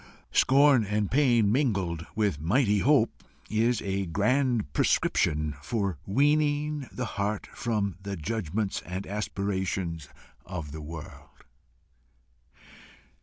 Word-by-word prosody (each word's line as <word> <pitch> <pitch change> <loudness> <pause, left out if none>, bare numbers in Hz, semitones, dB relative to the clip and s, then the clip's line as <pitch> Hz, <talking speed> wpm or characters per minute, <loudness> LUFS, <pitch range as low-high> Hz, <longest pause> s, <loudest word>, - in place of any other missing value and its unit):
Scorn 135 -2 +5
and 105 0 -1
pain 120 -7 +4
mingled 95 - 0
with 100 -9 0
mighty 105 - +2
hope 130 -1 +2 0.3
is 115 +1 +1
a 95 -1 -2
grand 115 - +1
prescription 75 0 +1
for 100 -2 -2
weaning 145 +3 +1
the 125 - -4
heart 100 -1 -2
from 105 -6 -1
the 100 0 -5
judgments 100 +2 -2
and 95 +2 -5
aspirations 95 -6 -3 0.3
of 85 -5 -6
this 80 +1 -7
world. 75 0 -10
100 Hz, 105 wpm, -28 LUFS, 90-125 Hz, 0.3 s, Scorn